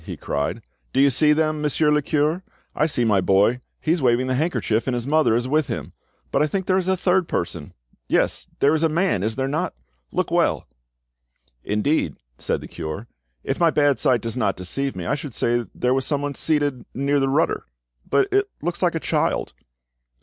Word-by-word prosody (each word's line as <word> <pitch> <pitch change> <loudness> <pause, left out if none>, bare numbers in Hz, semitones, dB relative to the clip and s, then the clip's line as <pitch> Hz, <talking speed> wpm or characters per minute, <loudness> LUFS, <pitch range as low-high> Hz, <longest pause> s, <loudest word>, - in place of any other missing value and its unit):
he - - -7
cried. 75 +11 -3 0.3
"Do 130 - +1
you 140 0 +5
see 150 +4 +4
them, 155 0 +1
Monsieur 150 0 +2
le 150 0 +3
cure? 155 +4 0 0.3
I 155 - +2
see 125 -6 0
my 105 -4 +3
boy; 100 +7 +3 0.2
he 155 - 0
is 170 -1 +1
waving 125 0 +3
the 130 - -1
handkerchief, 130 -6 0
and 130 - 0
his 120 -1 -3
mother 150 -5 +3
is 120 +2 0
with 150 +2 +1
him. - - -5 0.4
But - - +2
I 150 - +3
think 190 +3 -2
there 185 0 +2
is 185 - -3
a 190 0 +2
third 180 -1 +2
person—yes, - - -3
there 140 +2 +5
is 155 - +1
a 165 - +3
man, 170 - +1
is 110 +2 -1
there 130 0 -1
not? 155 +6 -2 0.4
Look - - -1
well." - - +1 1.0
"Indeed," 105 - 0 0.2
said - - -1
the - - -8
cure, 80 +8 -6 0.4
"if - - -2
my 170 -1 +5
bad 145 -3 +2
sight 125 -4 +3
does 115 0 -3
not 105 -7 0
deceive 135 +10 -3
me, 90 -2 -5
I - - 0
should 140 -4 -5
say 120 -1 0
there 125 +1 +1
was 135 0 0
someone 145 -1 -1
seated 145 -4 0
near 140 +2 +1
the 135 0 +1
rudder; 150 - +1 0.4
but 390 - +3
it 400 0 +2
looks 175 0 -3
like 175 -2 +2
a - - 0
child." - - 0
140 Hz, 205 wpm, -23 LUFS, 120-155 Hz, 1.0 s, you